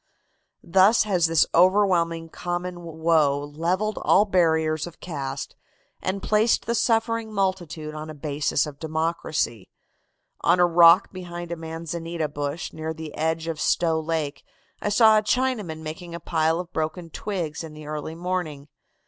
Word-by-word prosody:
"Thus 195 Hz, +6 st, +5 dB
has 185 Hz, -5 st, +2 dB
this 165 Hz, -1 st, +4 dB
overwhelming 175 Hz, -3 st, +3 dB
common 175 Hz, +1 st, -4 dB
woe 160 Hz, -3 st, +2 dB
levelled 170 Hz, +9 st, -2 dB
all 205 Hz, -, +4 dB
barriers 160 Hz, -4 st, +1 dB
of 170 Hz, -, -12 dB
caste 135 Hz, -5 st, -5 dB, 0.5 s
and 190 Hz, +1 st, -3 dB
placed 215 Hz, +2 st, +2 dB
the 235 Hz, -, 0 dB
suffering 230 Hz, -1 st, +1 dB
multitude 185 Hz, -6 st, -2 dB
on 155 Hz, 0 st, -7 dB
a 155 Hz, -, -8 dB
basis 145 Hz, -1 st, 0 dB
of 145 Hz, -2 st, -9 dB
democracy. 160 Hz, -, -2 dB, 0.7 s
On 180 Hz, -, +3 dB
a 175 Hz, -, +6 dB
rock 170 Hz, +1 st, +6 dB
behind 175 Hz, -2 st, -7 dB
a -, -, -1 dB
manzanita 165 Hz, 0 st, -4 dB
bush 145 Hz, +2 st, -4 dB
near 160 Hz, 0 st, -4 dB
the 160 Hz, -1 st, -8 dB
edge 160 Hz, +1 st, -1 dB
of 165 Hz, -2 st, -4 dB
Stow 165 Hz, -2 st, +2 dB
Lake 155 Hz, -3 st, -3 dB, 0.4 s
I -, -, 0 dB
saw 215 Hz, 0 st, +6 dB
a -, -, -2 dB
Chinaman 215 Hz, -8 st, -1 dB
making 165 Hz, +2 st, -7 dB
a -, -, -6 dB
pile 160 Hz, 0 st, +1 dB
of 180 Hz, 0 st, -7 dB
broken 160 Hz, +2 st, -3 dB
twigs 170 Hz, -6 st, -4 dB
in 155 Hz, -2 st, -9 dB
the 155 Hz, 0 st, -10 dB
early 155 Hz, +1 st, -5 dB
morning. 165 Hz, -5 st, -4 dB
165 Hz, 150 wpm, -24 LUFS, 155-185 Hz, 0.7 s, a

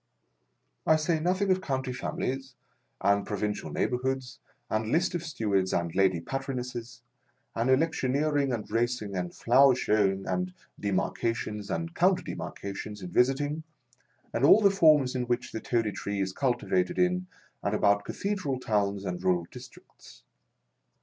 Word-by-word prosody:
I 160 Hz, -, +6 dB
say 155 Hz, +1 st, +1 dB
nothing 185 Hz, +4 st, +1 dB
of 185 Hz, 0 st, +2 dB
County 130 Hz, -5 st, -2 dB
families, 130 Hz, +1 st, -4 dB, 0.5 s
and 100 Hz, 0 st, +3 dB
pro 105 Hz, -, -4 dB
vincial 105 Hz, 0 st, -3 dB
neighbourhoods, 130 Hz, +1 st, -2 dB, 0.3 s
and 110 Hz, +1 st, -1 dB
lists 175 Hz, +3 st, +2 dB
of 175 Hz, -, -1 dB
Stewards 100 Hz, -, 0 dB
and 85 Hz, -1 st, -1 dB
Lady 95 Hz, -3 st, +3 dB
Patronesses, 125 Hz, +1 st, -5 dB, 0.5 s
and 115 Hz, +3 st, 0 dB
electioneering, 145 Hz, 0 st, +2 dB
and 115 Hz, -4 st, -3 dB
racing, 115 Hz, -3 st, -1 dB
and 90 Hz, -1 st, -2 dB
flower 130 Hz, +2 st, +5 dB
showing, 100 Hz, -5 st, +1 dB
and 180 Hz, 0 st, -2 dB, 0.3 s
demarca 105 Hz, +4 st, 0 dB
tions 105 Hz, -3 st, -5 dB
and 165 Hz, 0 st, -3 dB
counter 180 Hz, +1 st, +3 dB
demarcations 100 Hz, 0 st, -6 dB
in 90 Hz, -, -6 dB
visiting, 145 Hz, -, +2 dB, 0.7 s
and 115 Hz, -, -1 dB
all 200 Hz, +9 st, +8 dB
the 200 Hz, -2 st, +5 dB
forms 155 Hz, -8 st, +5 dB
in 125 Hz, -1 st, -1 dB
which 120 Hz, 0 st, -1 dB
the 110 Hz, -, -5 dB
Toady 115 Hz, -3 st, 0 dB
Tree 100 Hz, 0 st, -4 dB
is 95 Hz, -1 st, -1 dB
cultivated 120 Hz, -8 st, 0 dB
in 180 Hz, 0 st, +1 dB, 0.3 s
and 100 Hz, +1 st, 0 dB
about 100 Hz, -1 st, +3 dB
cathedral 185 Hz, -, -2 dB
towns 100 Hz, -4 st, 0 dB
and 90 Hz, -1 st, -4 dB
rural 90 Hz, -2 st, +2 dB
districts. -, -, -14 dB
125 Hz, 145 wpm, -28 LUFS, 100-145 Hz, 0.7 s, all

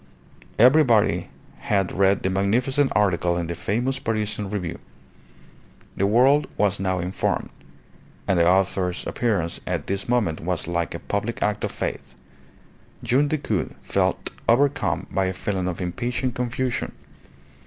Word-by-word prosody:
Everybody 125 Hz, -3 st, +4 dB, 0.3 s
had 95 Hz, -3 st, 0 dB
read 95 Hz, 0 st, +2 dB
the 95 Hz, -, +1 dB
magnificent 125 Hz, +9 st, +1 dB
article 90 Hz, -4 st, +2 dB
in 85 Hz, -, -1 dB
the 85 Hz, -, -3 dB
famous 120 Hz, +10 st, -1 dB
Parisian 105 Hz, -3 st, -2 dB
Review. 90 Hz, -5 st, -4 dB, 1.2 s
The 100 Hz, -, +1 dB
world 130 Hz, +7 st, +4 dB
was 100 Hz, -1 st, +2 dB
now 95 Hz, -1 st, 0 dB
informed: 90 Hz, +2 st, -2 dB, 0.8 s
and 95 Hz, -3 st, +2 dB
the 85 Hz, +1 st, +5 dB
author's 95 Hz, -1 st, +1 dB
appearance 95 Hz, -8 st, -1 dB
at 85 Hz, -5 st, -2 dB
this 100 Hz, +3 st, -3 dB
moment 110 Hz, -10 st, +1 dB
was 90 Hz, +2 st, -2 dB
like 85 Hz, -1 st, -2 dB
a -, -, -5 dB
public 105 Hz, +6 st, -2 dB
act 105 Hz, 0 st, -1 dB
of -, -, -1 dB
faith. 70 Hz, -1 st, -5 dB, 0.9 s
Young 140 Hz, +4 st, +3 dB
Decoud 140 Hz, -, -2 dB
felt -, -, 0 dB, 0.2 s
overcome 140 Hz, +4 st, +2 dB
by 95 Hz, -, +1 dB
a 95 Hz, -, -1 dB
feeling 95 Hz, -1 st, -2 dB
of 90 Hz, -1 st, -3 dB
impatient 120 Hz, +7 st, -2 dB
confusion. 125 Hz, +1 st, -2 dB
100 Hz, 135 wpm, -24 LUFS, 90-120 Hz, 1.2 s, the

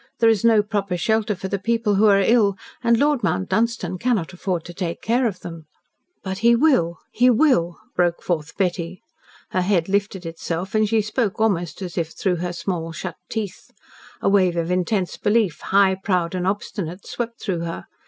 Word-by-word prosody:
There 230 Hz, -1 st, +5 dB
is 215 Hz, -4 st, 0 dB
no 225 Hz, -2 st, +5 dB
proper 200 Hz, -3 st, -2 dB
shelter 220 Hz, +3 st, +1 dB
for 190 Hz, -, -5 dB
the 200 Hz, +1 st, -2 dB
people 230 Hz, +1 st, +1 dB
who 205 Hz, +2 st, +4 dB
are 200 Hz, -1 st, +5 dB
ill, 205 Hz, -2 st, +3 dB, 0.3 s
and 235 Hz, -1 st, +4 dB
Lord 290 Hz, 0 st, +2 dB
Mount 95 Hz, -, -1 dB
Dunstan 215 Hz, -4 st, 0 dB
cannot 220 Hz, -8 st, 0 dB
afford 180 Hz, -2 st, -3 dB
to 175 Hz, -, -8 dB
take 170 Hz, -2 st, -3 dB
care 240 Hz, +2 st, +1 dB
of 195 Hz, -5 st, -5 dB
them." 165 Hz, -3 st, -9 dB, 0.6 s
"But 190 Hz, 0 st, -4 dB
he 235 Hz, +2 st, +5 dB
WILL 230 Hz, -, +3 dB
he 250 Hz, +2 st, +4 dB
WILL," 225 Hz, -, +3 dB, 0.2 s
broke 175 Hz, -1 st, +1 dB
forth 165 Hz, -3 st, -3 dB
Betty. 180 Hz, -1 st, -2 dB, 0.5 s
Her 185 Hz, -, +1 dB
head 180 Hz, -3 st, +1 dB
lifted 195 Hz, -2 st, -1 dB
itself 165 Hz, +2 st, -4 dB
and 215 Hz, -1 st, +2 dB
she 220 Hz, -1 st, +2 dB
spoke 215 Hz, -1 st, -1 dB
almost 195 Hz, -4 st, 0 dB
as 180 Hz, -1 st, -4 dB
if 160 Hz, -1 st, -3 dB
through 185 Hz, -3 st, 0 dB
her 175 Hz, +1 st, -3 dB
small, 170 Hz, -2 st, -3 dB
shut 175 Hz, +1 st, -6 dB
teeth. 210 Hz, -4 st, -5 dB, 0.5 s
A -, -, 0 dB
wave 185 Hz, -3 st, +3 dB
of 170 Hz, +1 st, -1 dB
intense 185 Hz, +1 st, 0 dB
belief 205 Hz, -7 st, +1 dB
high, 195 Hz, -1 st, +4 dB
proud, 185 Hz, -3 st, -1 dB
and 180 Hz, 0 st, -1 dB
obstinate, 195 Hz, -2 st, -3 dB
swept 235 Hz, -1 st, -5 dB
through 185 Hz, -5 st, -2 dB
her. 165 Hz, 0 st, -5 dB
190 Hz, 190 wpm, -22 LUFS, 175-220 Hz, 0.6 s, There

